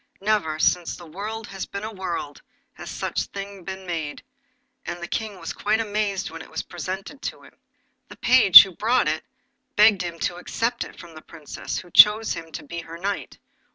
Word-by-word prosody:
Never, 200 Hz, -7 st, 0 dB
since 175 Hz, +2 st, +1 dB
the 175 Hz, -, -12 dB
world 210 Hz, +7 st, -6 dB
has 195 Hz, -1 st, -6 dB
been 200 Hz, -, -6 dB
a 220 Hz, -, -4 dB
world, 175 Hz, -6 st, -5 dB, 0.3 s
had -, -, -11 dB
such -, -, -3 dB
a -, -, -3 dB
thing 200 Hz, -1 st, -8 dB
been 190 Hz, +1 st, -7 dB
made, 160 Hz, -4 st, -4 dB, 0.6 s
and 175 Hz, 0 st, -6 dB
the 175 Hz, -, -6 dB
King 210 Hz, -2 st, -4 dB
was -, -, -5 dB
quite 215 Hz, +2 st, 0 dB
amazed 205 Hz, -4 st, -2 dB
when 165 Hz, 0 st, -8 dB
it -, -, -12 dB
was 160 Hz, -, -4 dB
presented 190 Hz, -, -7 dB
to -, -, -6 dB
him. -, -, -17 dB, 0.5 s
The -, -, -13 dB
page 230 Hz, -, +9 dB
who 195 Hz, -, -8 dB
brought 235 Hz, 0 st, +2 dB
it 155 Hz, +1 st, -1 dB, 0.5 s
begged 210 Hz, -2 st, +5 dB
him 170 Hz, -1 st, -5 dB
to 175 Hz, -, -1 dB
accept 230 Hz, +6 st, -2 dB
it -, -, -13 dB
from 170 Hz, -1 st, -12 dB
the 155 Hz, -, -11 dB
Princess, 155 Hz, -3 st, -7 dB
who 175 Hz, -, -8 dB
chose 215 Hz, +4 st, +7 dB
him 165 Hz, -1 st, -8 dB
to -, -, -6 dB
be 170 Hz, +3 st, -7 dB
her 165 Hz, 0 st, -10 dB
knight. 195 Hz, +3 st, -4 dB
190 Hz, 200 wpm, -24 LUFS, 170-210 Hz, 0.6 s, page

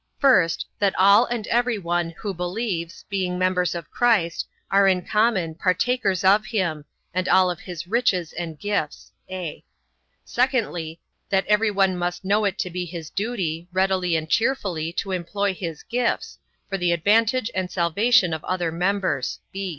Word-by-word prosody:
First, 190 Hz, -, +3 dB
that 200 Hz, -2 st, +1 dB
all 200 Hz, +5 st, +6 dB
and 235 Hz, -3 st, -3 dB
every 240 Hz, -1 st, +2 dB
one, 175 Hz, -2 st, -1 dB
who 205 Hz, -3 st, -4 dB
believes, 180 Hz, -1 st, -4 dB
being 185 Hz, -2 st, -2 dB
members 180 Hz, -1 st, +1 dB
of 170 Hz, -2 st, -7 dB
Christ, 210 Hz, -9 st, +1 dB, 0.2 s
are 195 Hz, 0 st, +5 dB
in 185 Hz, -2 st, +2 dB
common, 210 Hz, -7 st, +1 dB
partakers 190 Hz, +3 st, 0 dB
of 200 Hz, +3 st, +5 dB
him, 175 Hz, -9 st, -2 dB, 0.3 s
and 185 Hz, +1 st, -1 dB
of -, -, +4 dB
all 185 Hz, -1 st, +4 dB
his 170 Hz, 0 st, -8 dB
riches 185 Hz, -5 st, 0 dB
and 165 Hz, -2 st, -5 dB
gifts; 200 Hz, -7 st, -3 dB, 0.2 s
(a) 180 Hz, -5 st, -6 dB, 0.6 s
secondly, 195 Hz, -, -1 dB, 0.3 s
that 195 Hz, -1 st, +2 dB
every 210 Hz, +1 st, +3 dB
one 195 Hz, -2 st, +2 dB
must 175 Hz, +1 st, -3 dB
know 205 Hz, +2 st, +2 dB
it 195 Hz, -2 st, -1 dB
to 180 Hz, -, -3 dB
be 180 Hz, +1 st, -3 dB
his 165 Hz, -2 st, -8 dB
duty, 185 Hz, -6 st, -2 dB
readily 185 Hz, -2 st, +1 dB
and 160 Hz, 0 st, -1 dB
cheerfully 190 Hz, -8 st, 0 dB
to 195 Hz, -, -3 dB
employ 190 Hz, +3 st, -1 dB
his 170 Hz, -4 st, -6 dB
gifts, 245 Hz, 0 st, -2 dB, 0.3 s
for 195 Hz, -1 st, -3 dB
the 175 Hz, -1 st, +2 dB
advantage 220 Hz, +7 st, +2 dB
and 185 Hz, -1 st, -2 dB
salvation 185 Hz, +3 st, +3 dB
of 160 Hz, -, -4 dB
other 175 Hz, -3 st, -1 dB
members. 180 Hz, -6 st, -1 dB
185 Hz, 160 wpm, -23 LUFS, 170-205 Hz, 0.6 s, all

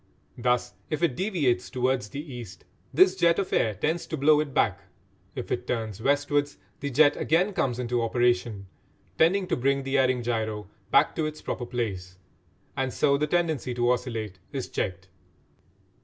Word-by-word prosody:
Thus, 125 Hz, -3 st, 0 dB, 0.2 s
if 155 Hz, +1 st, -2 dB
it 155 Hz, -7 st, +2 dB
deviates 150 Hz, -, 0 dB
towards 125 Hz, -3 st, 0 dB
the 140 Hz, -, -6 dB
east, 120 Hz, -6 st, -9 dB, 0.3 s
this 185 Hz, +5 st, +5 dB
jet 170 Hz, -2 st, +3 dB
of 195 Hz, -, -2 dB
air 110 Hz, -2 st, +2 dB
tends 160 Hz, -, -1 dB
to 160 Hz, -, -3 dB
blow 150 Hz, +2 st, +5 dB
it 150 Hz, -2 st, -2 dB
back; 100 Hz, -6 st, +1 dB, 0.6 s
if 125 Hz, -, -6 dB
it 125 Hz, 0 st, -2 dB
turns 110 Hz, -3 st, -3 dB
westwards 145 Hz, +2 st, +1 dB, 0.2 s
the 140 Hz, -, -3 dB
jet 145 Hz, +3 st, +5 dB
again 180 Hz, +6 st, +2 dB
comes 135 Hz, -10 st, 0 dB
into 120 Hz, -1 st, -1 dB
operation, 120 Hz, -3 st, +1 dB, 0.5 s
tending 185 Hz, +4 st, +4 dB
to -, -, 0 dB
bring 135 Hz, +2 st, +1 dB
the 135 Hz, +1 st, +1 dB
erring 130 Hz, -2 st, +2 dB
gyro 110 Hz, -3 st, -2 dB, 0.2 s
back -, -, +4 dB
to 155 Hz, -2 st, +1 dB
its 155 Hz, 0 st, -8 dB
proper 120 Hz, -, -4 dB
place; 95 Hz, -7 st, -4 dB, 0.6 s
and 130 Hz, -1 st, -1 dB
so 140 Hz, +2 st, +2 dB
the 150 Hz, +2 st, 0 dB
tendency 155 Hz, -7 st, 0 dB
to 120 Hz, 0 st, +2 dB
oscillate 115 Hz, -6 st, -3 dB
is 135 Hz, -3 st, -4 dB
checked. 95 Hz, -1 st, -3 dB
125 Hz, 170 wpm, -27 LUFS, 115-150 Hz, 0.6 s, this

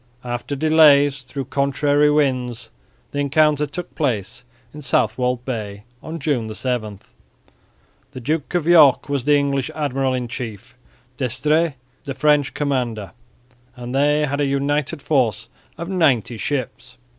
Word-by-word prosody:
After 120 Hz, +3 st, -4 dB
delays 145 Hz, -2 st, +5 dB
through 135 Hz, +1 st, -6 dB
contrary 145 Hz, +2 st, +2 dB
winds 125 Hz, -5 st, 0 dB, 0.4 s
the 145 Hz, -, -3 dB
encounter 150 Hz, +1 st, +2 dB
took 175 Hz, +4 st, -7 dB
place 120 Hz, -4 st, -2 dB, 0.3 s
in 150 Hz, -, -9 dB
Southwold 125 Hz, 0 st, 0 dB
Bay 105 Hz, -5 st, -5 dB, 0.2 s
on 160 Hz, +1 st, -6 dB
June 125 Hz, -9 st, -1 dB
7. 110 Hz, -3 st, -3 dB, 1.1 s
The -, -, -9 dB
Duke 150 Hz, +6 st, -2 dB
of 175 Hz, -3 st, +1 dB
York 155 Hz, -6 st, +5 dB
was 140 Hz, -3 st, -1 dB
the 145 Hz, 0 st, +5 dB
English 140 Hz, -2 st, -1 dB
admiral 135 Hz, -3 st, -1 dB
in 125 Hz, -1 st, -3 dB
chief, 115 Hz, -2 st, -7 dB, 0.4 s
D'Estrées 150 Hz, +5 st, 0 dB, 0.3 s
the 135 Hz, -, -5 dB
French 145 Hz, 0 st, +2 dB
commander, 125 Hz, -8 st, -2 dB, 0.6 s
and 125 Hz, 0 st, -7 dB
they 150 Hz, +2 st, +2 dB
had 140 Hz, +1 st, -2 dB
a -, -, +2 dB
united 140 Hz, +2 st, -1 dB
force 120 Hz, -6 st, 0 dB, 0.3 s
of 170 Hz, -, -5 dB
ninety 135 Hz, -, +1 dB
ships. 125 Hz, -2 st, -4 dB
140 Hz, 135 wpm, -21 LUFS, 125-150 Hz, 1.1 s, delays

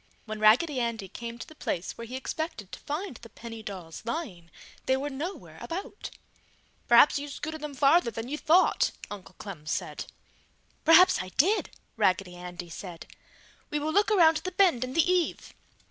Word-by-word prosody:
When 215 Hz, -1 st, -6 dB
Raggedy 255 Hz, +7 st, +4 dB
Andy 230 Hz, -4 st, -2 dB
came 235 Hz, +4 st, -7 dB
to -, -, -7 dB
the -, -, -14 dB
place 180 Hz, -, -3 dB
where 230 Hz, -, -8 dB
he 250 Hz, -, -6 dB
expected 265 Hz, -, -5 dB
to -, -, -8 dB
find 300 Hz, -, -4 dB
the 230 Hz, -, -13 dB
penny 225 Hz, +1 st, -9 dB
dolls 185 Hz, -6 st, -8 dB
lying, 220 Hz, -, -5 dB, 0.4 s
they 260 Hz, -, +3 dB
were 285 Hz, +2 st, -3 dB
nowhere 320 Hz, +8 st, -6 dB
about. 350 Hz, +4 st, -6 dB, 0.8 s
"Perhaps 240 Hz, +4 st, +6 dB
you 290 Hz, -, -6 dB
scooted 315 Hz, +2 st, -6 dB
them 300 Hz, -2 st, -6 dB
farther 275 Hz, +1 st, +4 dB
than 225 Hz, +1 st, -6 dB
you 285 Hz, -, -3 dB
thought!" 335 Hz, +4 st, +3 dB, 0.2 s
Uncle 195 Hz, -2 st, -9 dB
Clem 170 Hz, -7 st, -9 dB
said. -, -, -3 dB, 0.8 s
"Perhaps 330 Hz, +3 st, +7 dB
I 185 Hz, -, -7 dB
did!" 390 Hz, +10 st, +3 dB, 0.3 s
Raggedy 190 Hz, -3 st, +1 dB
Andy 175 Hz, -1 st, -8 dB
said, 175 Hz, -1 st, -8 dB, 0.6 s
"We 300 Hz, -, -1 dB
will 305 Hz, +1 st, -2 dB
look 410 Hz, +3 st, +4 dB
around 330 Hz, -6 st, +5 dB
the 370 Hz, +4 st, -4 dB
bend 355 Hz, -, +4 dB
in 255 Hz, 0 st, -5 dB
the 330 Hz, +2 st, +3 dB
eave!" 360 Hz, -2 st, 0 dB
255 Hz, 175 wpm, -28 LUFS, 210-320 Hz, 0.8 s, Perhaps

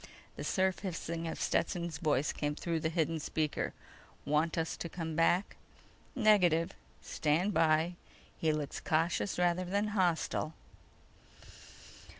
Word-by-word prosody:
_ -, -, -20 dB, 0.3 s
The -, -, -6 dB
surf 190 Hz, -1 st, +1 dB
hissing 170 Hz, -3 st, -4 dB
of -, -, -4 dB
Stetson's 170 Hz, -2 st, -1 dB
voice 150 Hz, -3 st, +1 dB
came 145 Hz, 0 st, -2 dB
through 165 Hz, 0 st, -2 dB
the 160 Hz, -, 0 dB
hidden 165 Hz, -1 st, 0 dB
speaker: 155 Hz, 0 st, -1 dB, 0.5 s
"Want 150 Hz, +3 st, +1 dB
us 160 Hz, 0 st, -1 dB
to 170 Hz, -, -5 dB
come 165 Hz, -2 st, -4 dB
back?" 175 Hz, +4 st, +2 dB, 0.6 s
_"Negative. 180 Hz, -8 st, +4 dB, 0.3 s
Stand 170 Hz, +7 st, +1 dB
by. 160 Hz, +1 st, +3 dB, 0.4 s
He 160 Hz, -, +1 dB
looks 150 Hz, -2 st, -3 dB
cautious 165 Hz, +5 st, 0 dB
rather 175 Hz, 0 st, +2 dB
than 200 Hz, +4 st, 0 dB
hostile." 175 Hz, -5 st, 0 dB
165 Hz, 130 wpm, -33 LUFS, 155-180 Hz, 0.6 s, Negative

